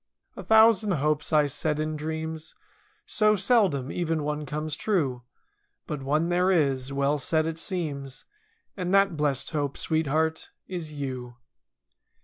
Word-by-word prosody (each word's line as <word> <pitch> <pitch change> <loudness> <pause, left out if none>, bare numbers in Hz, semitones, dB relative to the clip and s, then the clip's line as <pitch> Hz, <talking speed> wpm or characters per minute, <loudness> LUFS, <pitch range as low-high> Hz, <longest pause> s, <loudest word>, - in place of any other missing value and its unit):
A - - -7
thousand 220 -2 +5
hopes 150 -1 0
I 150 -1 +4
see 145 +2 -2
in 155 0 -2
dreams. 160 +1 -5 0.5
So 215 -1 +3
seldom 190 - +2
even 165 -3 -1
one 150 0 -3
comes 150 +1 -3
true— 150 - 0 0.6
But 150 -3 -5
one 150 +5 0
there 180 +1 +2
is, 140 -7 +1
well 140 +2 +1
set 155 +3 +1
it 165 0 -3
seems. 145 -8 -4 0.5
And 185 0 0
that 195 -3 +4
blest 145 -2 -1
hope, 145 -3 -2
sweetheart, 160 0 0 0.2
is 175 -4 -5
you. 130 -4 -5
155 Hz, 135 wpm, -26 LUFS, 145-175 Hz, 0.6 s, thousand